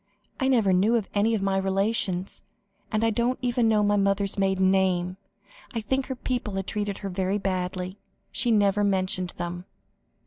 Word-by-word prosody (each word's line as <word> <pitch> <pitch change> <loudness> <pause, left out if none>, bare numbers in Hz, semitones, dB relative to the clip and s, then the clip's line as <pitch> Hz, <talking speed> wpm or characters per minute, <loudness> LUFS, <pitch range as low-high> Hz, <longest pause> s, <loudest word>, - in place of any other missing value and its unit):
I 265 - +1
never 225 -8 +3
knew 215 +6 +3
any 215 +2 +2
of 200 - -2
my 195 -1 +1
relations, 195 -1 0 0.5
and 215 +1 +1
I 225 - +3
don't 240 +3 0
even 240 -1 +2
know 215 -1 +3
my 205 0 +3
mother's 200 0 +1
maiden 190 -1 +2
name. 185 -1 +1 0.6
I 230 - -2
think 265 +5 -1
her 265 - -3
people 245 -5 -3
had 195 -1 -2
treated 205 -1 -3
her 200 - -5
very 190 +2 -1
badly; 185 -1 -3 0.3
she 245 - 0
never 205 -2 +3
mentioned 185 -2 0
them." 175 +1 -5
200 Hz, 170 wpm, -26 LUFS, 190-220 Hz, 0.6 s, never